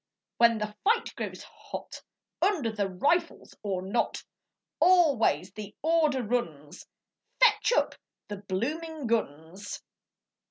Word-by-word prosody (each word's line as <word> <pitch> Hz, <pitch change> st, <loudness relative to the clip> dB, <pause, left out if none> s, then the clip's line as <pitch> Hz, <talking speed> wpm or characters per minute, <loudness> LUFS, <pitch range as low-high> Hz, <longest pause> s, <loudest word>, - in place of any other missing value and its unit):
when 235 Hz, -1 st, +5 dB
the 210 Hz, 0 st, -4 dB
fight 455 Hz, +3 st, +2 dB
grows -, -, -5 dB
hot, -, -, -9 dB, 0.4 s
Under 310 Hz, -, +2 dB
the 205 Hz, -3 st, -1 dB
rifles 280 Hz, -, 0 dB
or 190 Hz, -3 st, -2 dB
not, 200 Hz, +5 st, -1 dB, 0.6 s
Always 295 Hz, -, +4 dB
the 210 Hz, +1 st, -9 dB
order 310 Hz, -5 st, +2 dB
runs, 165 Hz, -11 st, -3 dB, 0.5 s
'Fetch 430 Hz, -3 st, +5 dB
up -, -, +2 dB, 0.3 s
the 205 Hz, -, -5 dB
bloomin' 285 Hz, -, -3 dB
guns!' 190 Hz, -3 st, -3 dB
230 Hz, 110 wpm, -28 LUFS, 195-320 Hz, 0.6 s, when